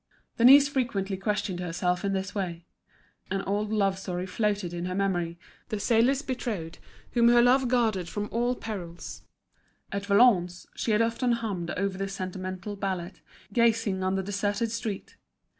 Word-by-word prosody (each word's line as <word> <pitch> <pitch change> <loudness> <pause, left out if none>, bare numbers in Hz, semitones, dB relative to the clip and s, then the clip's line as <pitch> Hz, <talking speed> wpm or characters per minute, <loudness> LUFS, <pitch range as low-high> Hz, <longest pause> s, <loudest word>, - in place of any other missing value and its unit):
Denise 275 +4 +8
frequently 225 -8 -1
questioned 200 -2 -2
herself 180 +1 -1
in 200 -1 0
this 195 +1 -2
way. 175 -4 -4 0.6
An 195 0 -1
old 205 +2 -1
love 195 -3 +1
story 180 -1 -3
floated 200 -2 -1
in 175 0 -3
her 185 0 -3
memory, 175 -4 -1 0.3
the 215 -3 -2
sailor's 240 +6 +3
betrothed 215 - -4 0.3
whom 235 -1 +4
her 240 0 +6
love 250 +2 +5
guarded 220 -8 +1
from 205 +2 -3
all 240 +2 +1
perils. 180 -8 -7 0.7
At 200 0 -3
Valognes 200 -5 +4
she - - -3
had 215 +1 +4
often 235 +2 +1
hummed 200 -7 -3
over 195 0 -1
this 195 0 -3
sentimental 185 +1 -5
ballad, 190 -2 -4 0.3
gazing 225 -4 +2
on 185 +1 +1
the 190 - -1
deserted 205 +3 -1
street. 220 -3 -5
200 Hz, 155 wpm, -28 LUFS, 185-230 Hz, 0.7 s, Denise